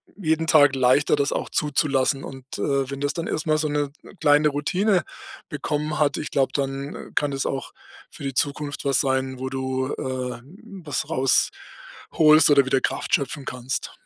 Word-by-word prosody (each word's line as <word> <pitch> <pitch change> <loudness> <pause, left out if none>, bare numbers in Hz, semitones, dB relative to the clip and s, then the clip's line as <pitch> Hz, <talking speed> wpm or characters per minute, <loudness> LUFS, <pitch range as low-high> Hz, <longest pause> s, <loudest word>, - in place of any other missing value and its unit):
jeden 160 -4 0
Tag 145 -4 +5
leichter, 130 +3 +3
das 140 0 0
auch - - -3
zuzulassen. 140 -2 +1
Und, 135 -1 -9
äh, 140 -2 0
wenn 140 0 -6
das 145 0 0
dann 170 -1 -4
erstmal 155 0 0
so 155 - 0
'ne 145 -1 -1 0.3
kleine 150 0 +5
Routine 180 +7 +1 0.5
bekommen 150 0 -3
hat, 145 -2 +2
ich - - -5
glaube, 135 -1 +1
dann 140 0 -4
kann 145 -1 +1
das 135 0 -2
auch 135 -1 -4 0.4
für - - -12
die 135 -1 -3
Zukunft 145 +1 -2
was 135 -1 +3
sein, 130 -1 -1
wo 130 0 -3
du, 130 0 -2
äh, 125 -2 -4 0.4
was 145 - -3
rausholst 155 +3 +2
oder 140 -1 +6
wieder 135 0 +2
Kraft - - -3
schöpfen 140 +1 0
kannst. 125 0 -4
140 Hz, 165 wpm, -23 LUFS, 135-150 Hz, 0.5 s, oder